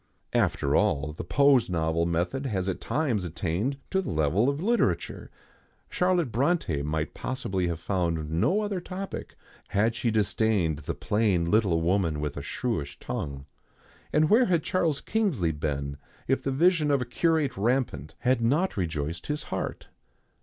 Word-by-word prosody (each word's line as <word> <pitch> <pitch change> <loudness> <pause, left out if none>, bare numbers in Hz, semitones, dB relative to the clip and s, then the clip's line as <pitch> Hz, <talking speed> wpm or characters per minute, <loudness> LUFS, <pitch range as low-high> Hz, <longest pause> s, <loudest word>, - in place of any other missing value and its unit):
After - - +1
all, 75 +2 +1
the - - -6
pose 135 - +4
novel 85 -1 +1
method 90 +11 -1
has 95 -5 -1
at 95 - -2
times 130 -10 0
attained 90 - -2
to 190 - +2
the - - -5
level 80 - +2
of 140 +1 -2
literature. 230 +7 0 0.6
Charlotte 180 -7 +1
Brontë 120 - +1
might 75 +1 -2
possibly 100 -9 -2
have 85 -2 -3
found 85 -4 -1
no 180 - +2
other 205 -3 -2
topic 190 +2 -6 0.3
had 105 +3 +2
she 120 +1 -1
disdained 105 -6 +1
the 75 - -4
plain 105 -5 +1
little 100 -6 +3
woman 85 -3 +1
with 75 -1 -3
a - - -4
shrewish 70 0 -3
tongue; 70 -1 -5 0.7
and 155 +1 +4
where 230 +8 +5
had 170 -6 +1
Charles 165 -6 0
Kingsley 175 - 0
been 70 -2 -3 0.3
if 135 - +2
the - - -2
vision 160 +2 +3
of 140 -1 +3
a - - -8
curate 155 +4 +1
rampant 105 - -1
had 125 -1 +2
not 150 +11 +2
rejoiced 80 -2 -3
his 150 0 -2
heart? - - -4
105 Hz, 155 wpm, -27 LUFS, -, 0.7 s, where